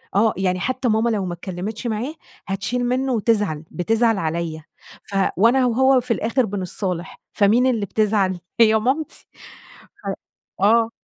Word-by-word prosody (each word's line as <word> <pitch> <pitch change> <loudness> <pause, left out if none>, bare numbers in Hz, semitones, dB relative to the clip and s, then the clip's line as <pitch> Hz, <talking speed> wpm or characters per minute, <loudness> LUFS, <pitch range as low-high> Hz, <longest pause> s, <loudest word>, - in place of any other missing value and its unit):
آه 215 +2 +4
يعني 185 -1 0
حتّى 255 +5 -1
ماما 220 +1 +2
لو 210 -4 -1
ما 175 - -3
اتكلّمتش 190 +6 -5
معاه 235 +6 -2 0.3
هتشيل 220 +6 -2
منّه 255 +2 0
وتزعل، 210 -9 0
بتزعل 225 +4 +1
عليَّ 160 -2 -3 0.5
ف 200 - -6 0.2
وأنا 230 +7 +4
هو 260 +2 +4
في 245 - -5
الآخر 230 +3 +1
بنصّالح، 185 -3 -4
فمين 220 +5 +3
اللي 225 -5 0
بتزعل؟ 200 -4 +1 0.2
هي 220 -1 +6
مامتي، 265 +8 -2
ف - - -15 1.2
آه. 225 +3 +4
220 Hz, 140 wpm, -21 LUFS, 190-240 Hz, 1.2 s, هي